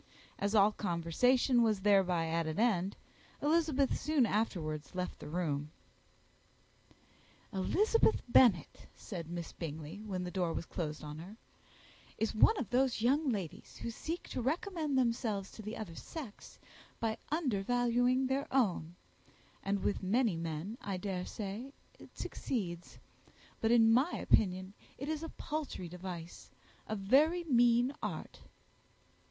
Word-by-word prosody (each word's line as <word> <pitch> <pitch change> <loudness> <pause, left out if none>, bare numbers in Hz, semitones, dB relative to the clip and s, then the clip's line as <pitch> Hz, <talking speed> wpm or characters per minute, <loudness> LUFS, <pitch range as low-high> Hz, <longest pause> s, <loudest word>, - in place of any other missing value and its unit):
As 200 +2 0
all 205 0 +6
conversation 215 - +2
was 215 -4 +2
thereby 190 -4 +3
at 165 0 0
an 160 +5 -3
end, 200 -5 +2 0.4
Elizabeth 300 -3 +2
soon 300 -4 +3
afterwards 175 -9 -2
left 180 0 -3
the - - -8
room. 150 -3 -1 1.8
"Eliza 410 - +2 0.3
Bennet," 235 - +4
said 170 -5 -7
Miss 170 -1 -5
Bingley, 160 +3 -6
when 190 -4 -3
the 180 - -4
door 175 -3 0
was - - -3
closed 155 -4 -4
on 150 +1 -7
her, 190 +7 -10 0.8
"is 220 0 0
one 420 - +5
of 240 - -4
those 250 -2 +2
young 280 +4 +3
ladies 190 -7 -4
who 235 - -4
seek 330 +9 -5
to - - -3
recommend 315 - -1
themselves 230 -5 0
to - - -10
the 215 +3 -6
other 210 -7 -6
sex 255 - -9 0.4
by 225 -1 0 0.2
undervaluing 245 - +2
their 265 +2 -1
own; 185 -10 +1 0.7
and 195 -1 -1
with 205 - 0
many 215 +1 +2
men, 165 +7 -4
I 195 -2 -3
daresay, 200 +6 -4 0.3
it - - -15
succeeds; 175 -9 -4 0.6
but, 225 - +1
in 225 -1 +6
my 270 +9 +3
opinion, 185 -1 +1 0.2
it 275 - -5
is 315 -1 -2
a 325 - -5
paltry 300 - -4
device, 175 -1 -8 0.4
a 215 - -2
very 290 - +3
mean 245 -2 +4
art." - - -5
215 Hz, 135 wpm, -33 LUFS, 180-255 Hz, 1.8 s, all